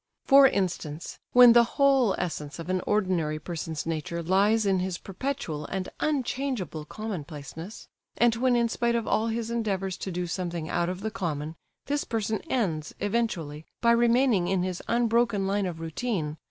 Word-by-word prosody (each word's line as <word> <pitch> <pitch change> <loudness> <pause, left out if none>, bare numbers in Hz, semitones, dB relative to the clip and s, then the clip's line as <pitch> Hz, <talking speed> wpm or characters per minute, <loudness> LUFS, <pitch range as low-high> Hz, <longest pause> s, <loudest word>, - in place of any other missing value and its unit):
For 275 -1 +8
instance, 170 - -3
when 245 -1 +9
the 235 0 +7
whole 270 -7 +4
essence 155 -4 -4
of 170 +2 -5
an 185 -1 0
ordinary 180 -7 +1
person's 160 -1 -5
nature 165 +1 -3
lies 205 +5 +3
in 190 -2 +2
his 185 -1 -2
perpetual 195 - -4
and 190 -1 -3
unchangeable 255 - -2
commonplaceness; 165 -2 -7 0.3
and 235 -1 +4
when 250 +1 +2
in 235 -1 +3
spite 235 +1 0
of 230 -1 -1
all 220 - +1
his 230 0 -2
endeavours 195 -5 -1
to 190 - -5
do 180 0 -2
something 170 -2 -3
out 170 0 0
of 185 +1 -5
the 220 +1 -3
common, 160 -7 -3 0.3
this 290 +1 -1
person 220 -1 -2
ends, 165 -11 -1
eventually, 185 -9 -2
by 235 - +4
remaining 235 -4 +3
in 185 -1 +1
his 185 -1 -3
unbroken 235 -3 +2
line 200 0 0
of 170 -2 -6
routine—. 165 -2 -3
195 Hz, 165 wpm, -27 LUFS, 170-235 Hz, 0.3 s, when